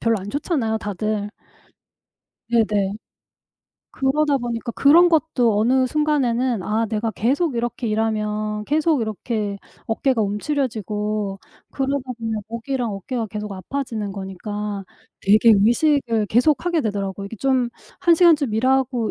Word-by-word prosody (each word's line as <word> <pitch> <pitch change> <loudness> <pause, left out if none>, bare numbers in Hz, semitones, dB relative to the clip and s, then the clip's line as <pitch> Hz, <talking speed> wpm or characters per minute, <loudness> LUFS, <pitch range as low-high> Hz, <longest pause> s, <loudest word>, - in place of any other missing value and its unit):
별로 230 -1 +2
안 195 +2 -8
좋잖아요 270 -7 -1
다들. 210 0 -3 1.2
네네. 210 -4 +1 1.0
그러다 280 +2 +1
보니까 235 -1 -3
그런 335 +5 +6
것도 265 -9 +2
어느 255 +4 +3
순간에는 255 -7 +1
아 220 +3 0
내가 220 +1 -2
계속 275 +7 0
이렇게 240 0 -2
일하면 215 -1 -1
계속 310 -1 +2
이렇게 215 -1 -3 0.3
어깨가 230 +1 +1
움츠려지고 210 - -2 0.3
그러다 270 -1 -2
보면 220 -2 -3
목이랑 235 0 -3
어깨가 225 +4 -4
계속 210 +1 -5
아파지는 215 0 -4
거니까 200 +1 -5 0.4
되게 215 +3 +5
의식을 230 0 +2
계속하게 305 - +2
되더라고요. 200 -2 -3
이게 225 - -8
좀 255 0 +1 0.3
1 340 -1 +5
시간쯤 315 -8 +4
일하고 255 -1 +1
230 Hz, 295 characters per minute, -22 LUFS, 210-270 Hz, 1.2 s, 그런